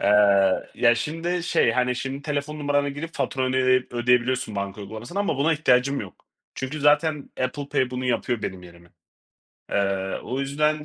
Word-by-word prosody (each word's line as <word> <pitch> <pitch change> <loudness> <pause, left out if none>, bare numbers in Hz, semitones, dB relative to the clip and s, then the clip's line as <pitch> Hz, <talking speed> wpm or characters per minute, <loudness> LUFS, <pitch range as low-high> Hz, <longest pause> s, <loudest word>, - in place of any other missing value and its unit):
Eee, - - 0 0.7
ya, 120 -1 +4
şimdi 165 +8 -2
şey, - - +2
hani, 125 -1 +1
şimdi 135 +2 -4
telefon 150 0 -3
numaranı 145 -1 +1
girip 145 +4 -6
faturanı, 130 -1 -1
eee, 130 -1 +3
ödeyebiliyorsun 125 -1 +1
banka 100 +1 -4
uygulamasından 110 - -5
ama 200 - 0
buna 145 +4 +2
ihtiyacım 140 -3 +2
yok. 95 -4 -11 0.3
Çünkü 135 +3 -4
zaten 150 0 +2
Apple 140 +3 -2
Pay 130 -2 0
bunu 130 0 -4
yapıyor 120 -2 -1
benim 90 -1 -4
yerime. 85 -1 -15 0.8
Eee, 95 -1 0
o 130 +2 -3
yüzden 150 +2 0
130 Hz, 160 wpm, -24 LUFS, 120-145 Hz, 0.8 s, ya